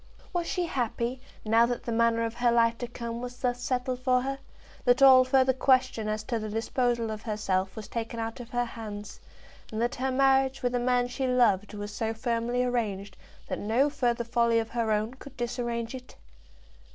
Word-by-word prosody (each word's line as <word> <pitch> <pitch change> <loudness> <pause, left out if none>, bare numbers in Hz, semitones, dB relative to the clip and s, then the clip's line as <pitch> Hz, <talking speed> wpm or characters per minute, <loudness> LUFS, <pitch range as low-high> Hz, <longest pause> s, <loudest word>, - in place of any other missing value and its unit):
Was 345 -1 -1
she 360 -1 -1
happy, 245 -3 -2 0.2
now 225 +2 +4
that 245 0 -3
the 235 - -4
manner 230 0 +2
of 225 0 -2
her 240 0 +2
life 230 0 +3
to 245 - -3
come 235 -1 -6
was 245 0 -6
thus 245 -1 -1
settled 250 0 -1
for 255 -1 +2
her; 270 +1 -3 0.4
that 245 +2 +4
all 260 -1 +9
further 260 0 +3
question 255 -4 +2
as 215 0 -2
to 230 0 -2
the 215 0 -5
disposal 230 +1 0
of 215 -1 -5
herself 195 -4 -1
was 215 -2 -7
taken 230 0 -4
out 225 +1 -4
of 240 -1 -9
her 245 -1 0
hands, 210 -3 -8 0.5
and 220 - -4
that 240 +1 0
her 265 +1 -2
marriage 270 0 +2
with 245 0 0
a 245 - +1
man 245 0 +2
she 250 +2 -2
loved 225 -5 +2
was 205 0 -6
so 225 0 -2
firmly 235 +1 0
arranged 205 -6 -2 0.3
that - - -3
no 240 +8 +2
further 240 -4 0
folly 235 0 +2
of 225 0 0
her 230 -2 -1
own 215 +3 0
could 275 +1 -13
disarrange 240 -1 -3
it? 255 -1 -10
240 Hz, 200 wpm, -28 LUFS, 225-255 Hz, 0.5 s, all